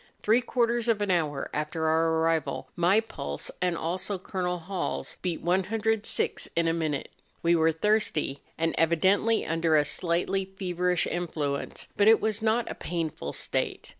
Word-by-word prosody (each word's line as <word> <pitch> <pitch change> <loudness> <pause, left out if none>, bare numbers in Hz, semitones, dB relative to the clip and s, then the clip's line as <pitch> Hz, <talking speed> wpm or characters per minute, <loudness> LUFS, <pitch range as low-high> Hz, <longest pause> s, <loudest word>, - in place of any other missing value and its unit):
Three 225 +4 +4
quarters 240 -1 +1
of 225 -2 +3
an 200 - 0
hour 150 -5 0
after 155 +2 -2
our 160 +1 +3
arrival 160 -2 0
my 180 +5 +4
pulse, 70 - -6
and 180 -2 +1
also 185 +5 -2
Col. 180 -1 -2
Hall's, 180 +2 -4
beat 180 -3 -2
106 210 +5 0
in 170 0 +2
a 165 - +2
minute; 155 -4 -2 0.3
we 170 0 +4
were 160 0 +4
thirsty, 160 -6 0 0.2
and 165 0 0
evidently 190 +7 +3
under 165 0 +1
a 150 - +3
slightly 175 +5 0
feverish 180 -2 0
influence; 155 -5 -3
but 205 - +4
it 225 0 +7
was 215 -1 -1
not 225 +2 +1
a - - -3
painful 160 - -4
state. - - -3
175 Hz, 155 wpm, -28 LUFS, 160-205 Hz, 0.3 s, it